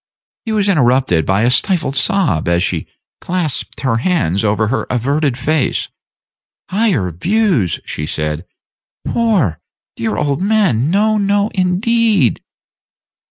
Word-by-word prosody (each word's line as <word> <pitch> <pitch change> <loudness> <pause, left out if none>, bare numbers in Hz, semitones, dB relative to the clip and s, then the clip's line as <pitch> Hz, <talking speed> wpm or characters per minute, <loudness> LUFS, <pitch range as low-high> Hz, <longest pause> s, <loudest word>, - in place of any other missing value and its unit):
He 225 - -3
was 210 -2 +1
interrupted 130 - +2
by 100 +3 +2
a 120 - +3
stifled 160 -1 +1
sob 140 - +1
as 85 0 +2
she - - -2 0.3
clasped 175 -6 -2
her 130 -4 +1
hands 115 - 0
over 110 +1 +1
her 135 - -2
averted 135 +2 0
face. 150 +1 0 0.8
"Higher 185 - +1
views!" 170 - 0
she 75 - -5
said; 75 +2 -3 0.6
"poor, 190 - +1 0.4
dear 110 -2 -2
old 145 +2 -1
man, 190 - +2
no, 210 +4 +2
no, 205 +1 +1
indeed." 200 - +1
145 Hz, 120 wpm, -16 LUFS, -, 0.8 s, a